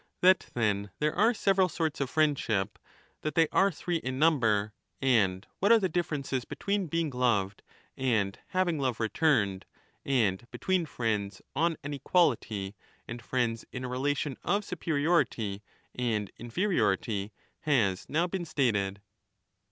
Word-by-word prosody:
That, 185 +1 +5
then, 105 -3 0
there 150 0 0
are 220 +5 +4
several 195 -4 +2
sorts 160 -4 -2
of 135 - -1
friendship, 140 -11 0 0.4
that 155 - -3
they 165 -2 +5
are 195 +1 +4
three 175 +1 -2
in 130 -4 -4
number, 115 -9 +2 0.3
and 105 -8 +2
what 200 +4 +3
are 230 - +9
the 195 -4 +1
differences 145 -6 -2
between 200 +5 -2
being 165 -1 -1
loved 115 -6 0 0.3
and 110 -7 0
having 180 -4 0
love 130 -4 -1
returned, 110 - +1 0.4
and 115 -8 +1
between 185 -3 -1
5 - - -20
friends 105 -4 -1
on 165 +1 +1
an 145 0 -4
equality 115 - +1 0.3
and 120 +1 -6
friends 120 -2 -1
in 130 - -5
a - - -3
relation 135 +2 -1
of 200 +4 0
superiority 145 - 0 0.3
and 110 -5 -1
inferiority, 115 - 0 0.3
has 115 - +1
now 165 +3 +2
been 180 0 -3
stated. 100 -10 0
130 Hz, 140 wpm, -29 LUFS, 110-165 Hz, 0.4 s, are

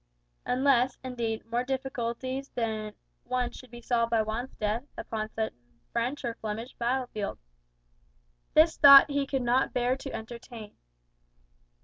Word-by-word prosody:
Unless, 260 0 +3
indeed, 235 -3 -3
more 235 +2 -1
difficulties 260 0 -3
than 215 -3 -2 0.3
one 250 0 -1
should 255 - -12
be 240 0 -11
solved 235 -1 +1
by 230 -1 +3
Juan's 225 +4 -4
death 215 +3 -1
upon 215 -1 -4
some 220 0 -2 0.4
French 245 +4 -1
or 235 - -1
Flemish 225 +3 -5
battle 250 +2 -1
field. 205 -2 -3 1.2
This 320 +1 +5
thought 280 0 +9
he 280 -1 0
could 270 -2 -1
not 245 +2 +2
bear 250 +1 +1
to 270 0 -7
entertain. 230 -1 -8
240 Hz, 135 wpm, -28 LUFS, 225-260 Hz, 1.2 s, thought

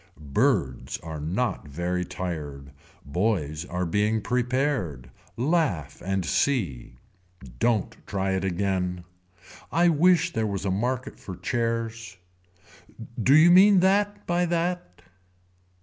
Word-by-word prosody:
Birds 65 -2 +1
are 80 -2 -6
not 90 +5 -2
very 90 +5 -2
tired. 80 -6 -6 0.3
Boys 80 -1 -1
are 90 +1 -3
being 105 +5 +1
prepared. 120 - -1 0.3
Laugh 130 - 0
and 95 -1 -1
see. 95 - -1 0.6
Don't 115 -5 +1
try 95 -1 -1
it 95 0 -1
again. 90 -1 -1 0.7
I 175 +1 +4
wish 170 +1 +3
there 110 -1 0
was 100 -1 -3
a 95 - 0
market 125 +6 -2
for 95 - -8
chairs. 115 -3 -3 1.0
Do 135 +6 +5
you 160 +3 +7
mean 190 +1 +7
that 205 +2 +1
by 175 0 +1
that. 170 - -2
105 Hz, 115 wpm, -26 LUFS, 90-140 Hz, 1.0 s, you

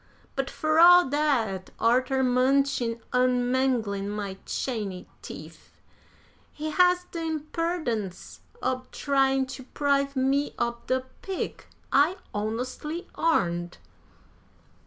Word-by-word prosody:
But, 270 0 -1
fur 310 0 +1
all 355 0 +8
dat, 250 -10 0
arter 255 +3 +2
munchin' 255 -2 +2
an' 250 -1 +2
manglin' 225 -7 0
my 205 -2 -4
chany 210 -8 -3
teef, - - -11 0.8
he 310 +1 -5
has 360 +1 +4
de 335 - -4
imperdence 310 - -3 0.2
ob 255 0 -2
tryin' 270 -1 +2
to 260 0 -8
'prive 280 +1 0
me 270 +2 +1
ob 235 0 -2
de 260 0 +1 0.2
pig 385 -1 -4 0.3
I 295 +6 +4 0.2
honestly 250 - -4
'arned." 175 - 0
265 Hz, 105 wpm, -27 LUFS, 235-300 Hz, 0.8 s, all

